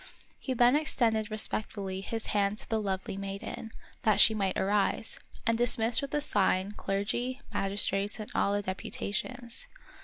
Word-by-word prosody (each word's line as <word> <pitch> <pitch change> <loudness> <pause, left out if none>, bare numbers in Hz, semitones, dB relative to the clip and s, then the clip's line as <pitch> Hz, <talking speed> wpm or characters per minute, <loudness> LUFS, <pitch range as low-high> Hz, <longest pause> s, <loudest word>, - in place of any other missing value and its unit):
He 260 - -3
then 245 +2 +5
ex 305 +1 0
tended 220 -3 +2
respectfully 205 -3 -2
his 225 +3 -4
hand 200 0 +1
to - - -5
the 220 -1 0
lovely 190 -1 -3
maiden, 195 +3 -5 0.3
that 215 -2 +3
she 220 - +8
might 195 -3 0
arise, 205 +2 +1 0.3
and 230 - +3
dismissed 230 0 +4
with 280 - -5
a 295 - +1
sign 195 -5 +2
clergy, 210 +6 -2
magistrates, 200 +1 +1
and 215 - -7
all 200 - +2
the 205 - -1
deputations. 235 +6 -4
210 Hz, 155 wpm, -30 LUFS, 195-230 Hz, 0.3 s, she